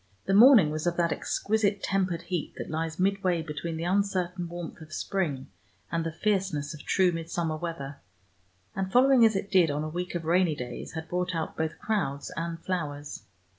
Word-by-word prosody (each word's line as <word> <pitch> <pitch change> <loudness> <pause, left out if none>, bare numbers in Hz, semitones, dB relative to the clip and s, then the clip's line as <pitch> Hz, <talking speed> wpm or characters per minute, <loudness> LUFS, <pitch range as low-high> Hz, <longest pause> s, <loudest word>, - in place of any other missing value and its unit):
The 195 - +1
morning 215 - +8
was 155 +2 -2
of 175 - 0
that 170 -1 +2
exquisite 205 -2 0
tempered 185 -3 0
heat 175 -4 -3
that - - -6
lies 160 0 -2
midway 185 -3 +1
between 160 +1 -4
the 165 - -3
uncertain 180 -2 0
warmth 175 -1 -7
of 155 -1 -12
spring 155 -7 -2 0.4
and 165 -1 0
the 165 - -2
fierceness 185 -5 -1
of 150 - -10
true 185 -2 +3
midsummer 165 -1 -2
weather, 155 -4 -5 0.8
and 190 0 -2
following, 255 +1 +6
as 220 -2 +5
it 195 +1 -3
did, 180 -4 +5
on 145 +1 -1
a 155 - -3
week 180 +2 -4
of 170 -2 -3
rainy 170 -1 +3
days 125 -3 -6
had 160 0 -5
brought 180 +1 -1
out 160 -1 -3
both 160 0 -2
crowds 165 -11 -2
and 165 +1 -3
flowers. 150 -6 -4
170 Hz, 185 wpm, -28 LUFS, 155-190 Hz, 0.8 s, morning